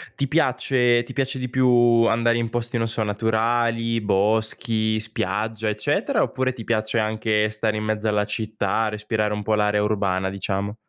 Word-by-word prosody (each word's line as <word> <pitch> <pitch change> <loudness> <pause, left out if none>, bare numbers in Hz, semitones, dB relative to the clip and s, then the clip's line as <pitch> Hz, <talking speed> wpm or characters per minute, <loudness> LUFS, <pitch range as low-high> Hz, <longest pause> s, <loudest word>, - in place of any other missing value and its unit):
Ti 140 - -1
piace 125 -4 +2
ti 120 - -9
piace 135 0 -2
di 125 -1 -4
più 120 -2 +4
andare 115 +1 +2
in 115 -1 -2
posti 120 +1 -2
non 115 0 0
so 115 0 -1
naturali, 115 +2 0
boschi, 110 +2 0
spiaggia, 110 0 -2
eccetera? 105 0 0
Oppure 130 -1 -1
ti 115 -3 -9
piace 110 0 0
anche 110 0 0
stare 110 0 -2
in 105 - -3
mezzo 110 0 -2
alla 105 -1 +1
città, 110 0 -1
respirare 105 0 -2
un 105 - -3
po' 110 +1 0
l'area 105 0 +1
urbana 100 -3 0
diciamo? 100 +1 -3
110 Hz, 165 wpm, -23 LUFS, 105-120 Hz, -, più